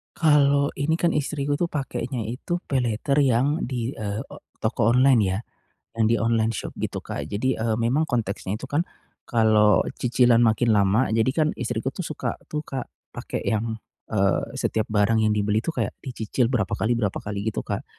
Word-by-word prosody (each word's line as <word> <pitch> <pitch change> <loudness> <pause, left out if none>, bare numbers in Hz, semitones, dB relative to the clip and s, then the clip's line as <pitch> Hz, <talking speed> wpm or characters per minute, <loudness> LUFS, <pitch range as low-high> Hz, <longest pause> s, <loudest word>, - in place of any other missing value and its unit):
Kalo 145 -3 +4
ini 160 +4 0
kan 170 -2 +2
istriku 145 -1 -1
tuh 170 +3 -1
pakenya 130 -3 -3
itu 155 +9 -3
paylater 125 0 0
yang 135 +5 +2
di, 125 0 -3
eee, 105 -1 -3
o - - -11 0.2
toko 115 - +1
online 125 -1 +5
ya, 95 +1 0 0.6
yang - - +5
di 115 - +3
online 115 -1 +1
shop 115 - -4
gitu - - -4
Kak. - - -5
Jadi, 120 +4 -1
eee, 110 -1 0
memang 130 +8 +1
konteksnya 105 -4 -2
itu - - -9
kan 145 +3 0 0.5
kalo 110 -3 +4 0.2
cicilan 120 -1 +4
makin 115 +1 +2
lama 100 +5 +3
jadi 115 +2 +2
kan 155 +1 +2
istriku 120 +1 -2
tuh 170 +7 -5
suka 155 - -3
tuh 150 0 -3
Kak 130 -3 -5 0.2
pake - - -5
yang, 110 +1 -1 0.3
eee, 95 -4 0
setiap 110 -1 -1
barang 105 +1 +2
yang 110 -1 +3
dibeli 105 +1 +1
tuh 165 +8 -4
kayak - - -1
dicicil 120 -1 -1
berapa 115 -7 -1
kali 110 +3 +1
berapa 105 -5 -1
kali 100 -1 -5
gitu - - -2
Kak. - - -4
120 Hz, 180 wpm, -24 LUFS, 110-140 Hz, 0.6 s, online